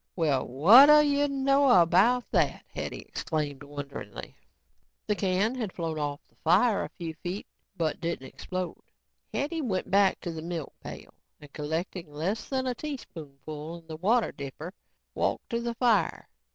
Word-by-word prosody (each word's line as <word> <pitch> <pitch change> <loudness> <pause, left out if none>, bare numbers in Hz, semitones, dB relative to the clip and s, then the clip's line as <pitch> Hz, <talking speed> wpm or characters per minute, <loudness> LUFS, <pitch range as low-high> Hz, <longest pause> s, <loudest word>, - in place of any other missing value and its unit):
"Well 150 -7 +1
whadda 245 - +8
you 290 0 +2
know 275 0 +3
about 195 +9 +4
that?" - - +1
Hetty - - -5
exclaimed 150 -3 -3
wonderingly. 145 -1 -8 0.7
The 210 - +1
can 195 +4 +1
had 230 -7 -3
flown 165 -3 -3
off 145 -1 -2
the - - -34
fire 195 +7 +3
a - - -6
few 165 -4 -6
feet 180 +3 -4 0.3
but 160 -3 -1
didn't 165 -5 -3
explode. 185 +5 -5 0.5
Hetty 315 +3 -2
went 200 -9 -2
back 195 0 +4
to 175 - -4
the 160 -1 -6
milk 165 -3 -5
pail - - -10 0.3
and 150 -1 -15
collecting 160 +2 -4
less 170 +9 -3
than 260 -1 -1
a 255 - 0
teaspoon 185 - -8
full 155 +2 -6
in 165 - -16
the 160 -1 -7
water 220 +7 +2
dipper, 145 +6 -7 0.4
walked - - -1
to 235 0 0
the 235 0 -3
fire. 225 -8 +1
180 Hz, 160 wpm, -28 LUFS, 155-235 Hz, 0.7 s, whadda